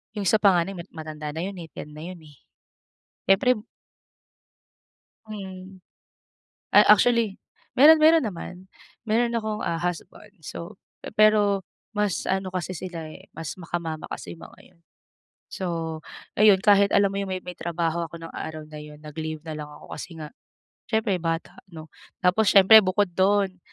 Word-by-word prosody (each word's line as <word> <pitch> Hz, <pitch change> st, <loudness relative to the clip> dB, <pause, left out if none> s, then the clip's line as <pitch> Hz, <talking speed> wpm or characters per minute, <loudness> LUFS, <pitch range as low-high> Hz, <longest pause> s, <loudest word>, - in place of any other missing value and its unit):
Yung 200 Hz, -3 st, -2 dB
sa 220 Hz, -, +4 dB
panganay, 195 Hz, -2 st, +3 dB
mat 170 Hz, -, -8 dB
matanda 155 Hz, -2 st, -6 dB
na 160 Hz, -, -3 dB
yun 195 Hz, 0 st, -5 dB
eh, 165 Hz, -, -8 dB
10 150 Hz, -, -9 dB
na 150 Hz, +1 st, -10 dB
yun 180 Hz, -1 st, -8 dB
eh. 150 Hz, -2 st, -17 dB, 0.9 s
Eh 195 Hz, 0 st, +6 dB
prib 250 Hz, -3 st, +1 dB, 1.7 s
Mm. 190 Hz, -2 st, -9 dB, 0.9 s
A -, -, +9 dB
actually, 230 Hz, -1 st, +3 dB, 0.4 s
meron 310 Hz, +4 st, +9 dB
meron 320 Hz, 0 st, +6 dB
naman. 180 Hz, -3 st, -6 dB, 0.5 s
Meron 235 Hz, +2 st, +1 dB
akong, 215 Hz, -2 st, -2 dB
ah, 165 Hz, -, -1 dB
husband. 180 Hz, +4 st, -5 dB
So, 170 Hz, +4 st, -8 dB, 0.2 s
pe-pero 210 Hz, -2 st, +3 dB, 0.3 s
mas 210 Hz, -3 st, -1 dB
ano 190 Hz, 0 st, -1 dB
kasi 185 Hz, 0 st, -3 dB
sila 165 Hz, -3 st, -7 dB
eh, -, -, -14 dB
mas 160 Hz, -1 st, -5 dB
maka-mama 165 Hz, -2 st, -4 dB
kasi -, -, -6 dB
yung 165 Hz, -, -12 dB
mga -, -, -19 dB
yun. 170 Hz, -, -31 dB, 0.7 s
So, 165 Hz, -3 st, -4 dB, 0.4 s
ayun 205 Hz, -2 st, +6 dB
kahit 200 Hz, -1 st, +4 dB
alam 200 Hz, -1 st, +4 dB
mo -, -, -3 dB
yung 195 Hz, -1 st, -4 dB
may 185 Hz, -, -3 dB
may 180 Hz, -1 st, -8 dB
trabaho 170 Hz, 0 st, -2 dB
ako 170 Hz, +2 st, -11 dB
nung 165 Hz, -, -9 dB
araw 155 Hz, -1 st, -6 dB
na 155 Hz, -, -9 dB
yun, 150 Hz, 0 st, -12 dB
nag-leave 155 Hz, +1 st, -6 dB
na 155 Hz, -1 st, -5 dB
lang 150 Hz, -1 st, -7 dB
ako -, -, -13 dB
kasi 175 Hz, -, -8 dB
nga, 150 Hz, -1 st, -7 dB, 0.6 s
siyempre 220 Hz, -3 st, +1 dB
bata 165 Hz, 0 st, -3 dB, 0.2 s
'no. 160 Hz, -1 st, -10 dB, 0.3 s
Tapos 185 Hz, +3 st, +3 dB
siyempre 205 Hz, +3 st, +8 dB
bukod 185 Hz, +1 st, +1 dB
dun, 190 Hz, 0 st, +2 dB
185 Hz, 160 wpm, -25 LUFS, 165-205 Hz, 1.7 s, A